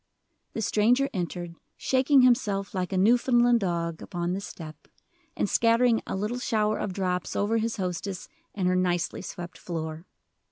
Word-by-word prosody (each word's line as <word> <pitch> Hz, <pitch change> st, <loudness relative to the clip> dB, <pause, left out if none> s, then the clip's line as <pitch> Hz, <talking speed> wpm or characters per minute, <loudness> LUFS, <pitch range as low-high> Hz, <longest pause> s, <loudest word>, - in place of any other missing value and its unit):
The 225 Hz, -, -3 dB
stranger 245 Hz, +8 st, +2 dB
entered, 175 Hz, -2 st, -4 dB, 0.2 s
shaking 265 Hz, +1 st, +3 dB
himself 210 Hz, -6 st, +2 dB
like 185 Hz, -2 st, -2 dB
a 190 Hz, -, 0 dB
Newfoundland 240 Hz, +3 st, +4 dB
dog 170 Hz, -4 st, -2 dB
upon 175 Hz, -1 st, -3 dB
the 195 Hz, -, -3 dB
step, 160 Hz, -5 st, -10 dB, 0.5 s
and -, -, +1 dB
scattering 230 Hz, +1 st, +3 dB
a -, -, -3 dB
little 210 Hz, +6 st, -2 dB
shower 215 Hz, -3 st, 0 dB
of 200 Hz, -, -2 dB
drops 180 Hz, -1 st, -2 dB
over 220 Hz, +3 st, +1 dB
his 225 Hz, +1 st, -1 dB
hostess 185 Hz, 0 st, -4 dB, 0.3 s
and 190 Hz, -3 st, 0 dB
her 185 Hz, -, +2 dB
nicely 175 Hz, -2 st, 0 dB
swept 175 Hz, -3 st, -8 dB
floor. 160 Hz, 0 st, -5 dB
195 Hz, 155 wpm, -27 LUFS, 175-230 Hz, 0.5 s, Newfoundland